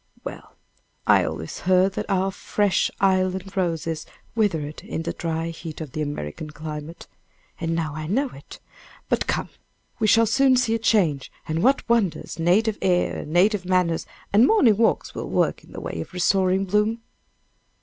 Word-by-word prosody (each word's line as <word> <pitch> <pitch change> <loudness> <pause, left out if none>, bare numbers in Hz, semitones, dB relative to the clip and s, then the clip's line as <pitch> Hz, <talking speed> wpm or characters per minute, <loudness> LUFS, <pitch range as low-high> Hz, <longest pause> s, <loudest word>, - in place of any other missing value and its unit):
Well, - - -9 0.5
I - - +5
always 80 - -5
heard 185 +1 +3
that - - -4
our 195 0 +1
fresh 205 0 +1
island 190 0 +1
roses 165 -4 -2 0.3
withered 160 -10 -1
in 165 - -5
the - - -3
dry 165 0 -3
heat 165 -1 -8
of 155 -5 -6
the 155 - -4
American 145 - -4
climate, 150 +1 -7 0.5
and 165 0 -1
now 160 -3 -2
I 155 0 -5
know 265 - +1
it! 140 - -12 0.5
But - - +1
come! - - -1 0.5
we 220 - +2
shall 225 +2 +5
soon 265 +3 +4
see 245 -3 +2
a 230 - 0
change 175 -12 +1 0.2
and 160 +1 -1
what 270 +6 +2
wonders 225 -9 0
native 205 +6 +2
air 180 -2 +1
and 150 - -7
native 190 +3 +3
manners 180 -3 +1 0.3
and 220 +5 +6
morning 260 - +5
walks 225 0 +1
will - - -5
work - - 0
in - - -18
the - - -7
way - - -4
of - - -9
restoring 190 +1 +2
bloom." 210 +4 +1
185 Hz, 170 wpm, -24 LUFS, 160-210 Hz, 0.5 s, and